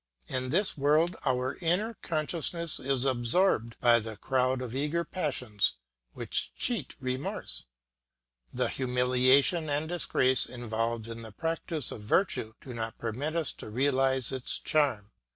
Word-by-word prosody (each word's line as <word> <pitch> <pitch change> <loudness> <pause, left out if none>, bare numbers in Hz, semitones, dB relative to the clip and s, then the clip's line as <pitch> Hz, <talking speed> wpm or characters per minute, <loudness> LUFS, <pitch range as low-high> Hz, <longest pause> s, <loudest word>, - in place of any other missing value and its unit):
In 130 0 -2
this 190 +8 +2
world 150 +5 +3
our 130 0 0
inner 180 +7 +1
consciousness 170 -2 -1
is 135 -1 0
absorbed 120 - +2
by 120 -1 +5
the 110 -1 -6
crowd 130 0 +1
of 125 -2 -5
eager 150 +5 0
passions 130 - 0 0.4
which - - -2
cheat 240 -3 -2
remorse. 130 - -4 0.9
The - - 0
humiliation 130 +5 +3
and 145 +2 0
disgrace 130 -6 +2
involved 115 -2 -3
in 115 0 -7
the 110 -1 -9
practice 165 - -3
of 110 - -7
virtue 110 - 0
do 130 - -8
not 115 -1 -4
permit 130 +8 -3
us 165 -3 0
to - - -9
realise 130 +2 +1
its 130 -2 -1
charm. 125 -9 +1
130 Hz, 135 wpm, -29 LUFS, 120-155 Hz, 0.9 s, by